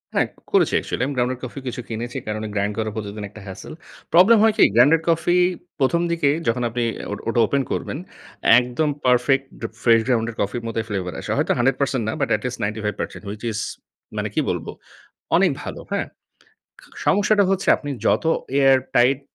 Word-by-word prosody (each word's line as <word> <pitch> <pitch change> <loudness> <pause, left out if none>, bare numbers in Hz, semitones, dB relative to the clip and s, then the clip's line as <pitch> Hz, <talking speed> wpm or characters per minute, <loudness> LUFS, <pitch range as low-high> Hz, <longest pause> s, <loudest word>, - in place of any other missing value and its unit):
হ্যাঁ। - - +3 0.2
করেছি - - +3
অ্যাকচুয়ালি 125 - -1
আমি 140 - -4
গ্রাউন্ডেড 125 +1 0
কফি 130 +2 -6
কিছু 125 0 -4
কিনেছি। 120 +3 -4
কারণ 110 0 -3
গ্রাইন্ড 100 +1 0
করে 110 -1 -1
প্রতিদিন 105 -1 -5
একটা 105 +1 -13
হ্যাসেল। 95 +8 -8 0.4
প্রবলেম 185 +7 +7
হয় 220 -1 +5
কি? - - +6
গ্রাউন্ডেড 145 +7 +6
কফি 170 +2 +2 0.4
প্রথম 155 +5 +2
দিকে 165 -4 +2 0.2
যখন 120 +2 +1
আপনি 120 +1 -2 0.3
ও - - -1 0.2
ওটা 115 - +1
ওপেন 140 +5 0
করবেন, - - -3 0.6
একদম 125 +5 -1 0.2
পারফেক্ট 125 +2 +3 0.4
ফ্রেশ 115 -1 +6
গ্রাউন্ডেড 115 -3 0
কফির 110 +4 -2
মতোই 115 -1 -2
ফ্লেভার 90 -3 -3
আসে। - - -5
হয়তো - - +1
100% 135 0 +1
না 110 - -1
but 140 - 0
at 105 - -4
least 125 -1 -4
95% 105 0 -3
which 105 +1 -7
is 110 - -3 0.6
মানে, - - -1
কি - - 0
বলব? - - -2 0.7
অনেক - - +4
ভালো। - - -6
হ্যাঁ? - - -1 1.0
সমস্যাটা 205 +1 +4
হচ্ছে 195 0 -1
আপনি 145 - -7 0.2
যত - - +2 0.3
এয়ার 135 -1 +6 0.2
টাইট 130 +3 +4
125 Hz, 175 wpm, -22 LUFS, 110-140 Hz, 1.0 s, প্রবলেম